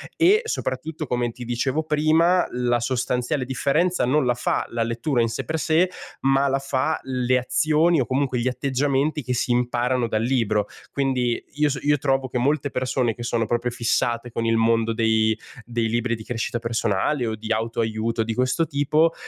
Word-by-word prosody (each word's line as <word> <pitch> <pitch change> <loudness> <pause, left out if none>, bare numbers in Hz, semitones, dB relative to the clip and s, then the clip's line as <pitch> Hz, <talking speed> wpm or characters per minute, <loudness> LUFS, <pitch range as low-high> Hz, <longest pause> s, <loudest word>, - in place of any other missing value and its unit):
e 390 +7 +4
soprattutto, 155 - -3
come 120 -2 -1
ti 125 - -9
dicevo 125 +6 -1
prima, 160 +4 +3 0.2
la 120 -1 +2
sostanziale 125 +2 -1
differenza 140 +6 +1
non 145 +4 +2
la 125 -1 +1
fa 120 - -1
la 115 -1 -1
lettura 115 +4 -1
in 115 - +1
sé - - -4
per 160 - -2
sé, 165 +3 +2 0.3
ma 135 +1 +3
la 135 0 +1
fa 135 +3 -1
le 130 -1 +1
azioni 155 +5 +2
o 130 - +1
comunque 130 0 0
gli 120 - -1
atteggiamenti 140 +3 0
che 125 +1 -2
si 125 0 0
imparano 125 0 +1
dal 110 -1 -1
libro. 115 -4 +1 0.2
Quindi 130 -3 0
io 150 +1 +2
so 135 -1 -2
io 145 0 +2
trovo 135 -1 0
che 125 - -3
molte 140 +3 +1
persone 125 -3 -1
che 120 - -7
sono 120 -1 0
proprio 120 +1 -1
fissate 120 0 0
con 115 - -2
il 115 0 +2
mondo 115 0 +2
dei 110 -1 +2 0.3
dei 115 -1 -1
libri 120 +1 0
di 110 - -9
crescita 120 +1 -3
personale 115 +3 0
o 110 -1 -2
di 110 +1 -7
auto-aiuto 115 0 -1
di 110 0 -3
questo 130 +7 +1
tipo 150 +3 +2
125 Hz, 185 wpm, -23 LUFS, 115-140 Hz, 0.3 s, e